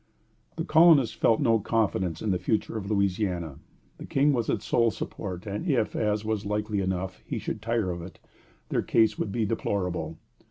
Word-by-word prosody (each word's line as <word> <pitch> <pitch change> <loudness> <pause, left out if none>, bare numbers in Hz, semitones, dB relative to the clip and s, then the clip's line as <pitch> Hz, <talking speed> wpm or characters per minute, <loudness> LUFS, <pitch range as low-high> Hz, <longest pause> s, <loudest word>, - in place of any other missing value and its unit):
" - - -39
The - - -2
colonists 155 -6 +5
felt 115 - +3
no 115 -5 +3
confidence 95 -6 0
in 110 - 0
the 90 - 0
future 110 +5 -1
of 100 -2 -4
Louisiana. 95 -6 -1 0.4
The - - -8
King 140 +2 +3
was 120 -4 -1
its - - -1
sole 115 -1 +3
support, 95 -2 -6
and 105 - -4
if, 125 -7 +1
as 105 -1 0
was 110 -2 -1
likely 105 0 -1
enough, 95 0 -3
he - - -4
should 110 - -4
tire 115 -4 0
of 85 -1 -5
it, 85 0 -10 0.5
their - - +1
case 110 -2 +2
would 105 - -2
be 115 +1 0
deplorable. 90 -7 -2
105 Hz, 190 wpm, -27 LUFS, 95-115 Hz, 0.5 s, colonists